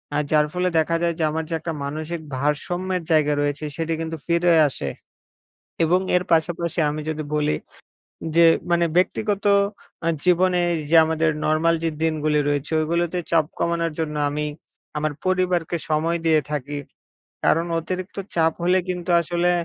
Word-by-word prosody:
আ - - +2
যার 150 -1 +4
ফলে 180 0 +1
দেখা 165 +1 +1
যায় 170 0 +1
যে, 160 - +1
আমার 160 +1 -2
যে, - - -3
একটা 165 +1 -4
মানসিক 155 +4 -4 0.2
ভারসাম্যের 175 +6 -1
জায়গা 150 -2 +4
রয়েছে, 145 +1 -2
সেটি 165 0 -1
কিন্তু 165 0 -4
ফিরে 170 +1 +3 0.2
আসে 70 - -5 0.9
এবং 175 +3 +3 0.2
এর 180 - +2
পাশাপাশি 170 +1 +1
আমি 150 +1 -4
যদি 155 -1 -3
বলি 150 0 +1 0.8
যে, 170 0 +7 0.3
মানে 170 0 +3
ব্যক্তিগত 205 +2 0 0.6
আ - - +4 0.2
জীবনে 180 0 +3
এইযে 160 0 +2
আমাদের 160 0 +1 0.2
নরমাল 160 +2 +3
যে, 165 - +2
দিনগুলো 155 -2 +1
রয়েছে, 145 +1 -2
ওইগুলোতে 170 +2 0
চাপ 165 -3 +4
কমানোর 170 -1 0
জন্য 150 -1 -2
আমি 150 +1 -2 0.5
আমার 150 0 -1
পরিবারকে 180 -2 +1
সময় 160 +2 +1
দিয়ে 160 -2 +4
থাকি 145 0 -3 0.7
কারণ 165 +2 +3
অতিরিক্ত 185 +4 -5 0.2
চাপ 165 -1 +3
হলে 180 +2 +4
কিন্তু 180 0 -4
আসলে 175 +1 0
165 Hz, 155 wpm, -23 LUFS, 155-175 Hz, 0.9 s, যে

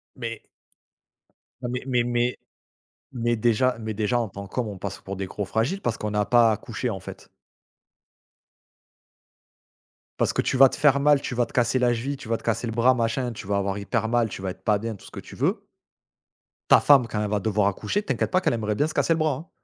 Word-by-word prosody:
Mais 115 -2 -6 1.2
Ah - - -3
mais 125 +1 -3
mais 125 -2 +1
mais 120 0 0 0.7
mais 120 -2 0
déjà 120 +3 +2
mais 110 -1 -4
déjà 110 +3 0
en 115 - -2
tant 100 +1 -8
qu'homme 115 +3 -3
on 100 -2 -7
passe 100 +1 -6
pour 100 +1 -6
des 95 0 -4
gros 105 +2 -4
fragiles, 115 - -1
parce 115 - -2
qu'on 105 -1 -3
a 105 0 +2
pas 115 +1 +5
à - - +3
accoucher, 115 +3 -4
en 95 -3 -5
fait. - - -11 2.9
Parce - - +1
que - - +1
tu - - -1
vas 135 +1 +9
te - - -5
faire 145 -2 +4
mal, 145 0 +4
tu - - -4
vas 120 0 +1
te - - -18
casser 125 +1 +2
la 120 -1 +3
cheville, 135 +5 -3
tu 125 - -11
vas 115 - +1
te - - -8
casser 115 +1 -1
le 115 - -3
bras, 120 +3 +4
machin, 120 +1 -1
tu 105 - -9
vas 100 - 0
avoir 100 0 -1
hyper 110 +2 -2
mal, 120 -1 +2
tu 100 - -8
vas 95 -1 -3
être 95 - -13
pas 105 -1 +3
bien, 110 +2 -4
tout 100 - -16
ce - - -13
que - - -8
tu - - -13
veux. - - 0 1.1
Ta - - +8
femme 135 -5 +5
quand 105 -1 -3
elle - - -1
va 105 - +1
devoir 105 0 +1
accoucher, 195 - -1
t'inquiète - - -1
pas 185 0 +2
qu'elle - - +1
aimerait 105 -2 -1
bien 145 - +2
se 155 - -4
casser 165 - +2
le - - -1
bras, 155 -2 +1
hein. 155 +7 -8
115 Hz, 240 wpm, -25 LUFS, 105-125 Hz, 2.9 s, vas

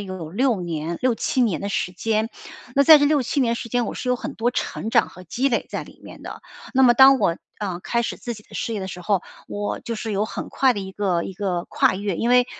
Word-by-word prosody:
有 185 -5 -6
6 240 0 +1
年 170 -1 -4
6-7 255 +1 +1
年 205 -10 0
的 200 - -3
时 180 - -1
间。 220 +4 -1 0.5
那 280 - +5
在 315 0 +10
这 290 0 +3
6-7 285 -2 +1
年 235 -2 +1
时 230 - -6
间 245 0 0
我 - - -4
是 255 - -5
有 250 - +3
很 245 - -6
多 240 +2 0
成 220 - -3
长 235 +1 +3
和 185 - -13
积 250 +11 0
累 240 - -1
在 - - -4
里 - - -15
面 - - -12
的。 - - -8 0.3
那 265 0 +5
么 240 - +6
当 265 +1 +8
我， 170 - +1 0.2
嗯， 185 -4 -4
开 235 0 0
始 - - -3
自 240 - -5
己 210 -2 -12
的 - - -17
事 230 - -3
业 215 - -2
的 190 - -4
时 180 -1 -7
候， 195 +1 +1 0.3
我 205 0 -3
就 230 -1 -5
是 220 0 -4
有 200 +2 +1
很 - - -6
快 265 -2 +3
的 205 - -5
一 190 -1 -6
个 190 -4 0
一 190 - -7
个 180 -3 -2
跨 185 - +2
越。 200 -1 -2
因 230 - -1
为， 250 0 +5
220 Hz, 265 characters per minute, -23 LUFS, 190-245 Hz, 0.5 s, 在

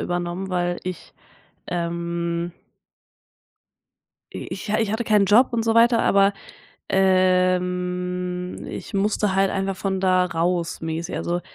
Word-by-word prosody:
übernommen, 175 +2 -3
weil 175 -1 -1
ich, 185 -1 -6 0.6
ähm 170 0 -2 1.8
i - - -6
ich 195 - -6
ich 215 0 +1
hatte 230 +2 -1
keinen 210 -3 +3
Job 225 +7 +5
und 230 -1 0
so 225 0 +1
weiter, 230 0 +5
aber, 195 0 +4 0.6
ähm, 180 -1 +1
ich - - -8
musste 205 0 +1
halt 195 0 +3
einfach 195 -1 -2
von 190 0 -2
da 185 -1 +3
raus, 175 0 -1
mäßig. 165 +2 -4
Also 175 +1 -2
185 Hz, 125 wpm, -23 LUFS, 175-195 Hz, 1.8 s, Job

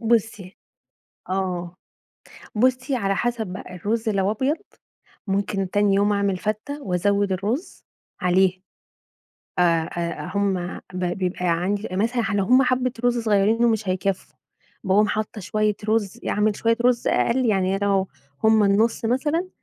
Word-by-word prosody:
بُصّي 220 -4 0 0.7
آه، 180 -2 -2 0.8
بُصّي، 255 +3 +1
على 195 -4 0
حسب 240 -1 -1
بقى 180 0 -8
الرز 220 +6 -2
لو 200 -2 +1
أبيض، 260 +8 0 0.7
ممكن 195 -1 -1
تاني 205 -1 +2
يوم 205 +1 +3
أعمل 200 -2 +1
فتّة، 215 +9 -4
وأزوِّد 200 0 +1
الرز 210 - -3 0.4
عليها 185 +1 +2 1.0
آآ 170 -2 +2
آآ 170 0 -3
هم 190 -3 -1
ب 180 0 -2
بيبقى 180 +1 -2
عندي 185 +5 0
مثلًا 230 +6 0
لو 200 - +2
هم 255 +6 +5
حبة 255 -1 +1
رز 245 0 +3
صغيرين 220 +1 +2
و - - +5
مش 220 -3 -1
هيكفّوا 190 +1 -2 0.5
باقوم 205 +2 +3
حاطة 215 0 -3
شوية 215 +2 0
رز، 215 -3 0
يعني - - -2
أعمل 210 0 +2
شوية 230 0 +2
رز 245 -1 +2
أقل 250 +2 +2
يعني 195 -3 +1
أنا 200 - -2
لو 195 -1 +1 0.4
هم 220 -1 +5
النُصّ 215 +4 +2
مثلًا، 295 +9 0
205 Hz, 145 wpm, -23 LUFS, 190-230 Hz, 1.0 s, هم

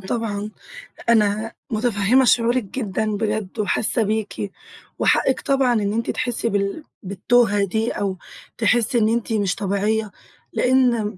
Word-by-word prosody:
طبعًا 210 0 -3 0.6
أنا 215 0 +2 0.2
مُتفهمة 225 +2 +2
شعورِك 240 +1 +3
جدًا 215 0 -3
بجد 215 -1 -3
وحَاسة 215 +2 +1
بِيكِ، 215 -1 -3 0.5
وحقِك 265 - +2
طبعًا 270 -3 +2
إن 205 -2 0
أنتِ 230 +1 -2
تَحسّي 240 -2 -2
بال 200 +8 -1 0.2
بالتوهة 205 +2 +2
دي، 220 +4 -1
أو 195 -2 -2 0.4
تحسي 240 0 +2
إن 220 -1 +3
أنتِ 230 0 -1
مش 200 -4 0
طبيعية، 205 +2 -1 0.4
لأن 240 -6 +2
220 Hz, 125 wpm, -21 LUFS, 205-235 Hz, 0.6 s, شعورِك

